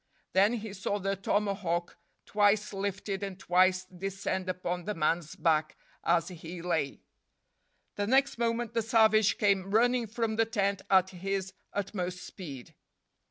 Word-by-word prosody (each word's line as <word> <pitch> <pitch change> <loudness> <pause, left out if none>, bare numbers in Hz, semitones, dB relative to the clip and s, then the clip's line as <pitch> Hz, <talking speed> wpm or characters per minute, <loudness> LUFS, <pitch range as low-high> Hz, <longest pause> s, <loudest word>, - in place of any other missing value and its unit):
Then 200 +4 +4
he 220 -3 -4
saw 200 +1 -2
the 195 0 -1
tomahawk 195 -3 -1 0.3
twice 205 0 +2
lifted 195 0 -3
and 195 -2 -4
twice 185 0 +3
descend 185 0 -4
upon 180 -1 -3
the 210 - -2
man's 160 0 0
back 155 -2 +1 0.3
as 170 +1 +2
he 170 0 -8
lay. 160 -6 -1 0.9
The 205 0 -1
next 265 +1 +3
moment 235 0 0
the 230 - +1
savage 220 -2 +4
came 195 -2 +2
running 240 +3 +3
from 220 0 -2
the 225 - +4
tent 200 -3 0
at 190 -1 +4
his 190 +1 -3 0.2
utmost 185 -3 -3
speed. 140 -9 -9
195 Hz, 140 wpm, -30 LUFS, 180-210 Hz, 0.9 s, Then